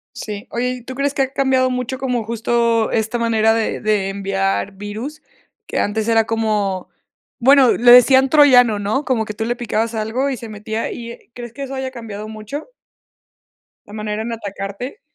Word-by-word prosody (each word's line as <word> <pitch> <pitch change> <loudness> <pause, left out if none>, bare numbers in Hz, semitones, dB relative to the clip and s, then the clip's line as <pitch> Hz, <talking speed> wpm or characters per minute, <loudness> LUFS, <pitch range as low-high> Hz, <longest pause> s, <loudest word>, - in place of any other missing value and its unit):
Sí. 210 -2 -6
Oye, 245 +1 -1
¿y - - -15
tú 260 +2 -8
crees 280 +1 0
que 290 - 0
ha 265 0 -1
cambiado 265 -2 +2
mucho 250 0 -3
como 250 -3 -1
justo 230 0 +1
esta 220 +1 0
manera 225 -1 +2
de 225 -1 -1
de 210 -3 0
enviar 195 0 -1
virus?, 215 +9 -7 0.5
que - - -2
antes 215 +1 -1
era 225 -1 +4
como, 210 -4 -1 0.5
bueno, 265 0 +6
le 240 +1 +5
decían 260 +2 +7
Troyano, 250 -7 +6
¿no?, 215 +8 -1
como 250 -4 +1
que 215 - -6
tú 220 +1 -3
le 240 +1 -1
picabas 230 -1 -2
algo 225 +6 -1
y 270 - -2
se 230 -1 -9
metía, 215 +1 -4
y, 235 -1 -7
eh, 235 - -15
¿crees 240 -1 -9
que 280 - -6
eso 270 0 -6
haya 265 0 -4
cambiado 215 -4 -7
mucho? 220 - -7 1.1
La 205 - -14
manera 210 0 -3
en 230 +1 -4
atacarte. 200 - -6
230 Hz, 185 wpm, -19 LUFS, 215-255 Hz, 1.1 s, decían